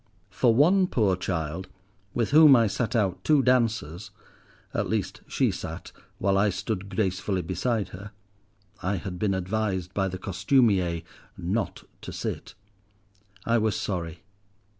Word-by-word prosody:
For 120 - +3
one 180 +8 +5
poor 105 - +2
child, 85 -1 -3 0.5
with 120 +1 0
whom 150 -2 +8
I 115 -2 +4
sat 110 +3 -1
out 95 -5 0
two 150 -3 +4
dances 115 - +1 0.6
(at - - -1
least - - -2
she - - +1
sat, - - -7 0.3
while 95 0 +2
I 105 +1 +3
stood 100 +1 -3
gracefully 95 -1 -1
beside 100 +5 -1
her—I 100 0 -8
had 90 -1 -5
been 100 -2 +1
advised, 95 -1 -2
by 95 -2 0
the 95 0 -4
costumier, 95 -3 +1 0.3
not 95 +6 -2 0.2
to - - -7
sit), - - -5 0.9
I 115 0 +3
was 110 -1 0
sorry. 85 -3 -4
100 Hz, 135 wpm, -26 LUFS, 95-115 Hz, 0.9 s, whom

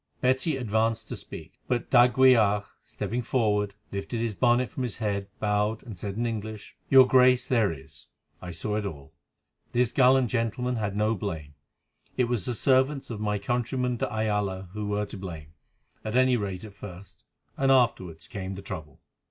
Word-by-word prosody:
Betty 130 +4 +1
advanced 110 -2 0
to - - -4
speak, - - -10
but 125 -2 -2
d'Aguilar, 120 -5 +5 0.2
stepping 120 +3 -4
forward, 105 -4 0 0.2
lifted 100 +4 -4
his 115 -1 -1
bonnet 120 +1 +2
from - - -5
his 120 -4 -3
head, 100 -3 -2
bowed 105 +1 0
and 115 -5 -8
said 100 +2 -5
in 120 - 0
English: 110 -2 -5
"Your 130 -1 +8
Grace, 125 -1 +4
there 115 -7 +2
is; 70 -4 -10 0.3
I 90 - -7
saw 105 +5 -2
it 105 - -2
all. 70 -7 -9 0.6
This 120 -1 +2
gallant 130 -1 +4
gentleman 125 +1 -1
had 105 -2 -2
no 105 +2 +2
blame. 80 -8 -5 0.6
It 125 - +3
was 120 -5 -1
the 125 - -1
servants 130 +3 +2
of 105 -2 -5
my 105 -1 0
countryman 125 +3 -1
de 105 - -2
Ayala 105 -4 -1
who 105 -1 -4
were 105 0 -1
to 100 - -8
blame, 80 -5 -8 0.5
at 110 +2 -4
any 130 0 +4
rate 100 -4 -3
at 105 -2 -10
first, 100 -1 -11 0.3
and 135 0 +2
afterwards 95 -11 +1
came 95 -1 -5
the 95 - -9
trouble." 75 -6 -8
110 Hz, 175 wpm, -27 LUFS, 100-125 Hz, 0.6 s, Your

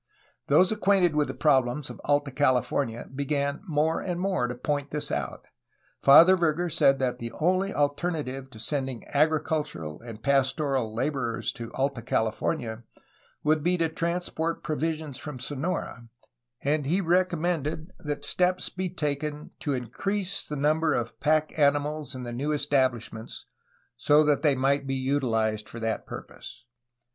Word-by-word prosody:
Those 185 +2 +5
acquainted 195 -6 +3
with 150 -1 +2
the 130 - -5
problems 130 0 +2
of - - -11
Alta 145 -1 +1
California 130 -3 0
began 140 +1 -1
more 155 0 +1
and 175 -2 -3
more 185 -9 0
to 125 - -4
point 145 +2 -2
this 150 0 -3
out. - - -3 0.6
Father 165 +7 +8
Verger 170 0 0
said 135 -3 +4
that 130 -2 -1
the 115 0 -5
only 185 +4 +2
alternative 145 -3 -1
to 115 - -13
sending 130 +1 -2
agricultural 150 - 0
and 115 -2 -10
pastoral 135 -3 +1
laborers 120 -2 -1
to 115 -1 -7
Alta 135 -2 -1
California 110 +1 -1 0.6
would 155 0 +3
be 175 +3 +2
to 165 -1 +1
transport 170 0 -2
provisions 155 -2 -2
from 150 -3 -6
Sonora, 135 -3 -4 0.5
and 145 0 0
he 175 +6 +2
recommended 170 -3 0
that 145 -1 -4
steps 180 0 +2
be 185 0 -3
taken 150 -2 -3
to 145 - -1
increase 190 - -3
the 150 - -4
number 155 +3 +2
of 115 -1 -3
pack 155 +1 +1
animals 145 0 +1
in 130 - -6
the 120 -1 -5
new 140 +5 -2
establish 135 -5 +1
ments 110 +1 -8 0.5
so 150 +1 +5
that 150 -2 +2
they 150 -4 +3
might 135 +1 +1
be 135 - -1
utilized 115 -6 0
for 115 - -8
that 115 -1 -2
purpose. - - -9
145 Hz, 150 wpm, -27 LUFS, 130-160 Hz, 0.6 s, Father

